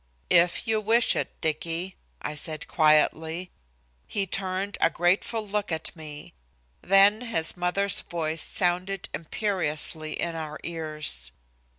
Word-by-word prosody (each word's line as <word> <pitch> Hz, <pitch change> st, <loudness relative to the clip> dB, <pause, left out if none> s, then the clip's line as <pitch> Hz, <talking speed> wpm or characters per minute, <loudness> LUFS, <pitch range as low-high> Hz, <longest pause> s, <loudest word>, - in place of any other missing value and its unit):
"If 170 Hz, +4 st, +4 dB
you 220 Hz, -1 st, +1 dB
wish 230 Hz, +3 st, +4 dB
it, -, -, -3 dB
Dicky," 165 Hz, +4 st, -2 dB, 0.3 s
I -, -, -2 dB
said 155 Hz, +1 st, -4 dB
quietly. 160 Hz, +2 st, +2 dB, 0.6 s
He 200 Hz, -2 st, 0 dB
turned 190 Hz, +2 st, -1 dB
a -, -, +5 dB
grateful 190 Hz, +6 st, 0 dB
look 205 Hz, -1 st, -2 dB
at 160 Hz, +2 st, -3 dB
me. 150 Hz, -2 st, -10 dB, 0.5 s
Then 200 Hz, +3 st, +5 dB
his 165 Hz, -8 st, 0 dB
mother's 180 Hz, +2 st, +2 dB
voice 160 Hz, -2 st, -2 dB
sounded 180 Hz, +1 st, -1 dB
imperiously 155 Hz, -4 st, -1 dB
in 170 Hz, -1 st, -2 dB
our 155 Hz, -2 st, -5 dB
ears. 155 Hz, -, -3 dB
170 Hz, 120 wpm, -26 LUFS, 155-195 Hz, 0.6 s, a